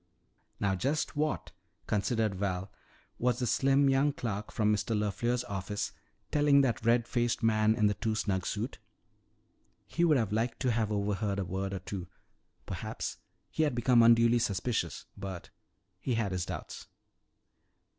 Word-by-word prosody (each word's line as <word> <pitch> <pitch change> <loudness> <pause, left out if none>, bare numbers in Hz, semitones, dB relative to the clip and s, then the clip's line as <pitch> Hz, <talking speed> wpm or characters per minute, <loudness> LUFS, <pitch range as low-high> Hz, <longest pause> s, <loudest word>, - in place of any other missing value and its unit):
Now 100 -1 +1
just 140 +13 -1
what, 150 -11 -1 0.3
considered 110 0 0
Val, 95 0 -2 0.5
was 125 -1 +2
the 125 - -1
slim 135 +4 +3
young 135 +2 +3
clerk 105 -5 -4
from 105 -1 +2
Mr. 110 +1 -1
LeFleur's 120 +4 0
office 100 0 -3 0.4
telling 145 -1 +5
that 120 -6 0
red 115 0 +3
faced 120 -1 0
man 110 -1 +3
in 110 - +2
the 105 - +4
too 110 +1 -2
snug 95 -4 -1
suit? 110 +4 -3 1.1
He 170 - -1
would 155 -4 +5
have 110 -5 0
liked 115 +3 -1
to 130 -2 +2
have 110 -2 0
overheard 100 0 -1
a 100 - -1
word 95 +2 -3
or 95 - -3
two. 95 -1 -6 0.6
Perhaps - - -4 0.3
he - - -1
had 150 -5 +2
become 120 0 +4
unduly 115 +1 +6
suspicious 100 -5 -1
but 95 -3 -7 0.5
he 120 +5 -1
had 110 -4 0
his 90 -1 -2
doubts. - - -7
110 Hz, 155 wpm, -31 LUFS, 100-125 Hz, 1.1 s, unduly